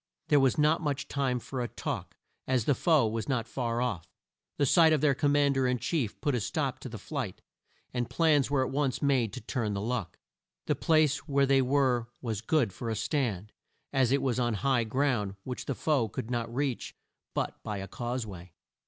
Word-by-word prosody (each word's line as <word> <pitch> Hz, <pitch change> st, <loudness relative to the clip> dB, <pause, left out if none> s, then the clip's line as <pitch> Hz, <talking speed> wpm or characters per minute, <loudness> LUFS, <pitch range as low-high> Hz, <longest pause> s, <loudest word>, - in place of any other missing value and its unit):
There 145 Hz, -, +6 dB
was 135 Hz, -2 st, +3 dB
not 155 Hz, +2 st, +3 dB
much 145 Hz, -3 st, -2 dB
time 135 Hz, -3 st, 0 dB
for 125 Hz, +1 st, -5 dB
a 120 Hz, -, -1 dB
talk, -, -, -5 dB, 0.3 s
as 130 Hz, -4 st, +1 dB
the 145 Hz, -, +4 dB
foe 150 Hz, -3 st, +3 dB
were 110 Hz, +1 st, -2 dB
not 125 Hz, -5 st, -1 dB
far 120 Hz, -1 st, -1 dB
off. 90 Hz, -9 st, -3 dB, 0.5 s
The 145 Hz, -, +3 dB
sight 160 Hz, +3 st, +6 dB
of 150 Hz, -, +2 dB
their 150 Hz, -2 st, +4 dB
Com 145 Hz, +1 st, +1 dB
mand 140 Hz, -1 st, +3 dB
er 130 Hz, -, +2 dB
in 125 Hz, 0 st, +1 dB
chief 125 Hz, -, -2 dB
put 145 Hz, -, +1 dB
a 125 Hz, -, +1 dB
stop 135 Hz, -, -2 dB
to 130 Hz, -, -7 dB
the 115 Hz, -, -7 dB
flight, 120 Hz, -, -5 dB, 0.5 s
and 120 Hz, -2 st, -1 dB
plans 145 Hz, -3 st, +3 dB
were 135 Hz, -2 st, +2 dB
at -, -, -5 dB
once 135 Hz, -1 st, 0 dB
made 130 Hz, -6 st, +2 dB
to -, -, -6 dB
turn 110 Hz, -2 st, -2 dB
the -, -, -2 dB
luck. 110 Hz, -4 st, -3 dB, 0.5 s
The -, -, +2 dB
place 155 Hz, -2 st, +2 dB
where 140 Hz, -1 st, +3 dB
they 135 Hz, 0 st, +4 dB
were 130 Hz, -3 st, +2 dB
was 110 Hz, -4 st, -3 dB
good 120 Hz, -, +1 dB
for 115 Hz, -, -5 dB
a 110 Hz, -, -1 dB
stand, 110 Hz, -, -1 dB, 0.4 s
as 130 Hz, -3 st, +3 dB
it 140 Hz, -, +2 dB
was 130 Hz, -2 st, 0 dB
on 120 Hz, -2 st, +1 dB
high 130 Hz, +1 st, +1 dB
ground 110 Hz, -5 st, 0 dB
which 125 Hz, -1 st, -5 dB
the 140 Hz, -, -1 dB
foe 135 Hz, -8 st, +1 dB
could 110 Hz, +4 st, -5 dB
not 115 Hz, -1 st, -2 dB
reach 130 Hz, 0 st, -2 dB, 0.4 s
but -, -, -2 dB
by 105 Hz, -, -4 dB
a 95 Hz, 0 st, -5 dB
cause 120 Hz, +4 st, -3 dB
way. 90 Hz, -4 st, -10 dB
130 Hz, 215 wpm, -29 LUFS, 115-140 Hz, 0.5 s, There